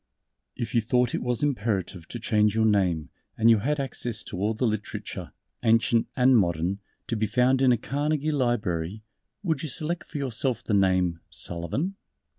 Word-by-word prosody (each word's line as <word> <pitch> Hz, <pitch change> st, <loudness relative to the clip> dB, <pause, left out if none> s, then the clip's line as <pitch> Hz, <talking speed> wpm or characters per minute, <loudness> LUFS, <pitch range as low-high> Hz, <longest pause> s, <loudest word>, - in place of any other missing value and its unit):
"_ -, -, -54 dB, 0.5 s
If 120 Hz, -2 st, -4 dB
you 120 Hz, -, +4 dB
thought 125 Hz, +1 st, +1 dB
it -, -, -1 dB
was 125 Hz, +1 st, 0 dB
imperative 100 Hz, -, -1 dB
to -, -, -6 dB
change 105 Hz, -2 st, +2 dB
your 110 Hz, 0 st, +3 dB
name 95 Hz, -7 st, +2 dB, 0.3 s
and 115 Hz, +1 st, +6 dB
you 110 Hz, -, +5 dB
had 145 Hz, +7 st, 0 dB
access 125 Hz, -4 st, -3 dB
to 90 Hz, -, -7 dB
all 105 Hz, +3 st, 0 dB
the 125 Hz, -, 0 dB
Literature 110 Hz, -3 st, -4 dB, 0.3 s
Ancient 115 Hz, 0 st, +3 dB
and 130 Hz, 0 st, +5 dB
Modern 90 Hz, -1 st, +1 dB, 0.3 s
to -, -, -2 dB
be 110 Hz, 0 st, 0 dB
found 130 Hz, +3 st, +3 dB
in 130 Hz, -2 st, +5 dB
a 120 Hz, -, +4 dB
Carnegie 150 Hz, +5 st, -1 dB
Library, 110 Hz, -, -1 dB, 0.4 s
would 160 Hz, -7 st, 0 dB
you 155 Hz, -, -4 dB
select 165 Hz, +4 st, -2 dB
for -, -, -5 dB
yourself 130 Hz, -2 st, -1 dB
the 110 Hz, -, -2 dB
name 90 Hz, -3 st, +2 dB
"Sullivan?" 130 Hz, -, -3 dB
115 Hz, 180 wpm, -26 LUFS, 100-130 Hz, 0.5 s, and